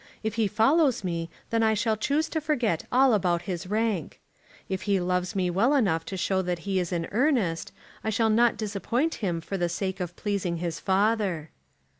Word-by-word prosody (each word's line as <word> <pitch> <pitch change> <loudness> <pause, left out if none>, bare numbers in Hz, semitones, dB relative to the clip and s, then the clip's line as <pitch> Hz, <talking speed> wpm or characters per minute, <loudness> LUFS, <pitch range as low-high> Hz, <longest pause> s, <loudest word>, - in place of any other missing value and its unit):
If 220 -1 -1
he 225 -1 +1
follows 250 - +3
me 170 -2 -3 0.2
then 230 0 +2
I 220 -1 +3
shall 220 +1 +1
choose 285 +9 0
to 315 - -2
forget 245 - 0
all 260 0 +5
about 175 -4 +1
his 180 0 -4
rank. 210 -5 -1 0.5
If 190 -1 -3
he 195 -1 +3
loves 180 +2 -1
me 180 -2 +1
well 230 +11 +3
enough 180 -11 +2
to 190 - -5
show 190 +1 +1
that 180 -1 -2
he 195 -1 +1
is 180 0 -2
in 170 -2 -1
earnest, 225 - +1 0.3
I 220 - -1
shall 220 +1 +2
not 235 +1 +3
disappoint 220 - -1
him 175 -5 -1
for 195 +3 -4
the 175 0 +1
sake 190 +2 -3
of 175 -1 -4
pleasing 195 -5 -2
his 170 -1 -3
father." 195 -5 +1
200 Hz, 195 wpm, -27 LUFS, 180-225 Hz, 0.5 s, all